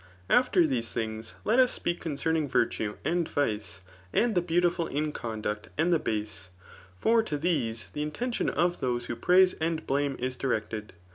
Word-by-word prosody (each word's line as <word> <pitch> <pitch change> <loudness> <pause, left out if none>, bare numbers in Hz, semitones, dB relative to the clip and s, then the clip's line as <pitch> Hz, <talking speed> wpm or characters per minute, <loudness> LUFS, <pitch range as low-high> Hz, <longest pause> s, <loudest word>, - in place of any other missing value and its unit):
After 215 -9 +5
these 125 -6 -1
tbiogs 110 -1 -4
let 230 +4 +3
us 255 -1 +5
speak 175 - -3
conoenuDg 160 -1 0
viilae 105 -4 0
and 170 +2 +1
Yice,, 105 -8 -2 0.3
and 235 -1 +2
the 175 - +3
beautiful 175 0 +1
in 150 +2 -1
conduct 110 -4 -4
and 170 +3 +3
the 165 - +3
base; 105 -6 -3 0.5
for 225 - +4
to 155 -10 -3
these 140 -9 -1
the 150 - -4
intention 235 +12 -1
of 175 0 +1
those 120 -2 -1
who 120 - -4
praiae 180 +9 +5
and 160 0 -1
blame 140 0 0
it 130 +1 -3
directed. 110 -4 -2
150 Hz, 165 wpm, -28 LUFS, 115-175 Hz, 0.5 s, After